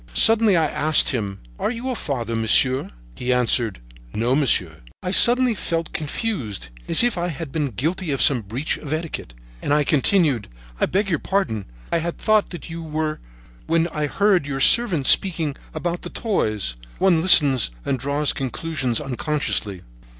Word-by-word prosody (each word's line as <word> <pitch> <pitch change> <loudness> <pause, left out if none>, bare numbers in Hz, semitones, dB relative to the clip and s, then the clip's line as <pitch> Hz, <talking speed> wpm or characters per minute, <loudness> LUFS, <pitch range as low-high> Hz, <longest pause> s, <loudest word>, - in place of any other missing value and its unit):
Suddenly 225 -4 +5
I 160 - +2
asked 155 0 +3
him: 100 -7 -3 0.2
"Are - - -1
you 245 +2 -4
a - - -2
father, 120 - -4
monsieur?" 130 +4 +3 0.2
He 125 - -3
answered: 120 - +1 0.3
"No, 120 +4 0
monsieur." 100 - +2 0.3
I 180 - -3
suddenly 245 +3 +4
felt 165 -5 -4
confused, 140 - -4 0.2
as - - +4
if 240 -7 0
I 175 - -1
had 160 -3 -6
been 150 -1 -1
guilty 160 - -3
of 135 -2 -2
some 130 -4 +3
breach 115 +9 -4
of 145 - -9
etiquette, 155 - -5 0.3
and - - -3
I 150 0 +3
continued: 145 - +1 0.3
"I - - +1
beg 200 +3 -1
your 160 - 0
pardon. 190 - -2 0.3
I 170 - +1
had 170 +1 -4
thought 215 -1 +1
that 175 - -9
you 165 0 -7
were 155 -1 -3 0.5
when 165 +1 +1
I 150 -2 -3
heard 195 -2 +1
your 135 -1 -4
servant 180 - +4
speaking 160 -6 +4 0.2
about 175 0 -4
the - - -8
toys. 110 - -2 0.2
One 185 -4 +2
listens 140 - +6 0.2
and 130 - -1
draws 145 +3 0
conclusions 135 -2 -3
unconsciously." 125 - -3
150 Hz, 165 wpm, -21 LUFS, 125-175 Hz, 0.5 s, listens